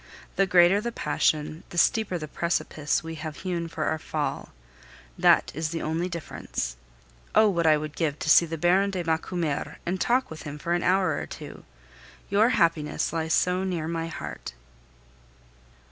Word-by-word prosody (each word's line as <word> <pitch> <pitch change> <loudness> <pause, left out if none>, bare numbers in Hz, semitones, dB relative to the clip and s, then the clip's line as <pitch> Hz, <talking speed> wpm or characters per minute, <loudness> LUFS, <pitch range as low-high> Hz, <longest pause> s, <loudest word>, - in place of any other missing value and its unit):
The 195 - +3
greater 180 +2 +5
the 235 +2 -3
passion, 155 -3 0
the 175 - -9
steeper 205 0 +2
the 155 -2 -6
precipice 155 -1 -1
we 165 0 -6
have 155 -1 -5
hewn 175 -3 -2
for 160 -1 -4
our 160 +1 0
fall 145 -3 -3 0.7
that - - +4
is 155 +2 -2
the 165 0 -4
only 165 +3 -1
difference. 155 - -5 0.6
Oh! 220 - +7
what 170 -5 +1
I 155 -1 +6
would 150 0 -6
give 155 -4 -1
to - - -5
see 170 +2 +6
the 165 +1 -4
Baron 185 +5 +3
de 185 -3 -3
Macumer 165 -2 -2
and 185 +2 -2
talk 250 -2 +1
with 160 - -8
him 145 -1 -7
for 170 +3 -2
an 175 - +1
hour 185 +1 +2
or - - -5
two! - - -10 0.7
Your 210 +4 +4
happiness 165 -10 +1
lies 160 -1 +1
so 180 +1 +1
near 175 -4 -2
my 165 0 -2
heart. 160 - -7
165 Hz, 175 wpm, -26 LUFS, 155-185 Hz, 0.7 s, Oh